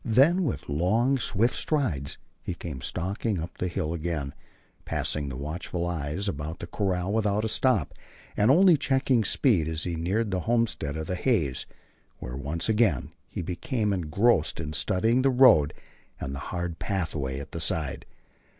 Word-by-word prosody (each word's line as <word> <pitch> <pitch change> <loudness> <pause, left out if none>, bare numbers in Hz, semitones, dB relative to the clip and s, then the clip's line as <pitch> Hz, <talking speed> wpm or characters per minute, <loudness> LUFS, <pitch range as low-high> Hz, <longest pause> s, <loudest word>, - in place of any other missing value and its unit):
Then 140 - +4
with 135 - -3
long, 110 - +2
swift 110 +1 +1
strides 90 - -1 0.2
he 90 - -4
came 75 -7 -7
stalking 100 - -2
up 85 +2 -7
the 90 - 0
hill 80 -2 -2
again, 80 -4 -3 0.5
passing 75 -2 -1
the 65 - -6
watchful 85 +4 -4
eyes 85 +3 -2
about 75 -1 -4
the - - -6
corral 95 +1 -1
without 105 -1 +1
a - - +1
stop, 105 - +1 0.4
and 105 +2 +3
only 175 +3 +6
checking 135 -4 +2
speed 100 - +2
as 80 0 -2
he 85 -2 -2
neared 100 +7 -1
the 95 - 0
homestead 115 -11 0
of 80 - -3
the 90 - -3
Hays, 90 - 0 0.5
where, 60 - -6
once 75 +5 -3
again, 110 - +2 0.2
he - - -4
became 105 - -1
engrossed 90 +1 +2
in 75 -1 -4
studying 110 - +2
the 135 - +3
road 125 - +6 0.5
and 65 - -4
the 70 - -5
hard 85 -2 -3
pathways 75 -9 -2
at 70 - -9
the - - -5
side. 75 -4 -1
90 Hz, 165 wpm, -27 LUFS, 75-115 Hz, 0.5 s, only